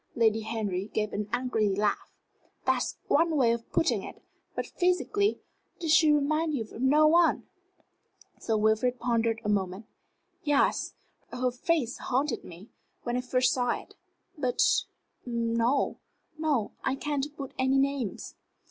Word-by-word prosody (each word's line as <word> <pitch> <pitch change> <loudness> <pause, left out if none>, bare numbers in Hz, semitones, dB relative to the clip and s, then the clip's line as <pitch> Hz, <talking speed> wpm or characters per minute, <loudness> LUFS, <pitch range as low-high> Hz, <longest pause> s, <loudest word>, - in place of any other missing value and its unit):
Lady 225 -2 +3
Henry 210 -4 -3
gave 215 -1 -1
an 205 0 -3
angry 240 -4 +1
laugh. 205 +1 -1 0.5
"That's - - 0
one 330 -1 +3
way 245 -4 +4
of 235 0 -4
putting 325 - +2
it. - - -9 0.4
But - - -2
physically 400 +3 0 0.4
did 325 -3 -1
she 315 -1 +6
remind 305 +2 +1
you 235 - -1
of 220 +2 -10
no 295 +4 +5
one?" 335 +2 +4 1.0
Sir 220 -1 0
Wilfrid 220 +4 +2
pondered 230 -2 +1
a - - -4
moment. 195 0 -1 0.6
"Yes. 290 -1 +1 0.4
Her 250 0 0
face 255 -1 -1
haunted 260 0 -1
me, 180 +5 -12 0.3
when 240 0 -2
I 250 - 0
first 255 0 +2
saw 245 -1 0
it. - - -16 0.4
But 255 -5 -2 0.6
no; 235 +2 0 0.4
no, 300 -9 0
I 265 - 0
can't 285 0 -2
put 275 -2 -6
any 260 +1 +3
names." 270 -6 -1
250 Hz, 140 wpm, -28 LUFS, 225-295 Hz, 1.0 s, she